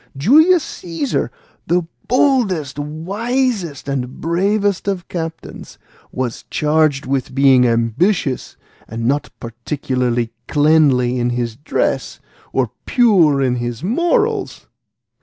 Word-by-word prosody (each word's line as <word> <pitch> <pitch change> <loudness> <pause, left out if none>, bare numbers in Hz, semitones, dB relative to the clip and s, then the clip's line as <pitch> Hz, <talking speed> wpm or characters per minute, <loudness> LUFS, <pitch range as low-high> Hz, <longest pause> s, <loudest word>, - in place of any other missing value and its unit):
Julius 310 - +5
Caesar, 175 +10 -3 0.4
the 175 +1 +2 0.2
boldest, 205 - +1
wisest, 190 - -2
and 130 -2 -3
bravest 200 +4 0
of 190 -3 -2
captains, 165 -2 -7 0.3
was 125 -3 -4
charged 150 -2 +1
with 130 -1 -2
being 135 -2 +5
ambitious, 125 - 0 0.3
and 115 +1 -5
not 140 +4 0
particularly 120 0 -2 0.2
cleanly 145 -5 +3
in 120 0 0
his 120 -2 -2
dress, 145 +6 -2 0.3
or - - 0 0.2
pure 175 - +4
in 125 -1 +1
his 120 +2 -4
morals. 385 - 0
150 Hz, 100 wpm, -18 LUFS, 125-200 Hz, 0.4 s, Julius